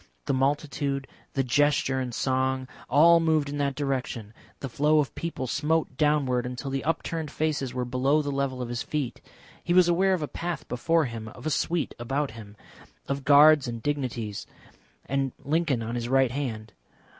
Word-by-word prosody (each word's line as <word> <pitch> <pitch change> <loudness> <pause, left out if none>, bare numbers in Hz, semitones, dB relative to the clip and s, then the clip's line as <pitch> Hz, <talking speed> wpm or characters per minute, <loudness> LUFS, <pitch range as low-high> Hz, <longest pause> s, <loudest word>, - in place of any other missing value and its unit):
The - - 0
multitude, 140 0 0 0.3
the 135 - +1
gesture 135 +1 +2
and 130 -1 -3
song, 130 +1 0 0.2
all 170 +3 +6
moved 155 -3 +1
in 145 0 -4
that 140 -1 0
direction, 130 -6 -3 0.3
the 135 - -4
flow 150 +5 +2
of 150 -3 +1
people 165 -6 -4
smote 150 +2 0
downward 140 -4 +2
until 125 +2 -5
the 135 0 -2
upturned 165 0 -2
faces 150 -5 -1
were 125 -1 -1
below 135 +5 +1
the 145 - -2
level 135 -2 -2
of 120 - -6
his 120 0 -3
feet. 145 -6 -3 0.4
He 175 - +1
was 180 -1 +6
aware 185 +2 +3
of 165 - -4
a - - -2
path 170 0 -5
before 160 +6 +1
him, 115 -3 -6
of 120 - -11
a 155 - 0
suite 170 +2 0
about 135 +3 -1
him, 105 -2 -11 0.5
of 140 0 -2
guards 145 0 +7
and 115 -1 -5
dignities, 125 -8 -3 0.6
and 135 -1 -1
Lincoln 145 -5 0
on 115 +1 -4
his 120 0 -3
right 135 -2 +3
hand. 115 -6 -4
140 Hz, 180 wpm, -27 LUFS, 125-150 Hz, 0.6 s, guards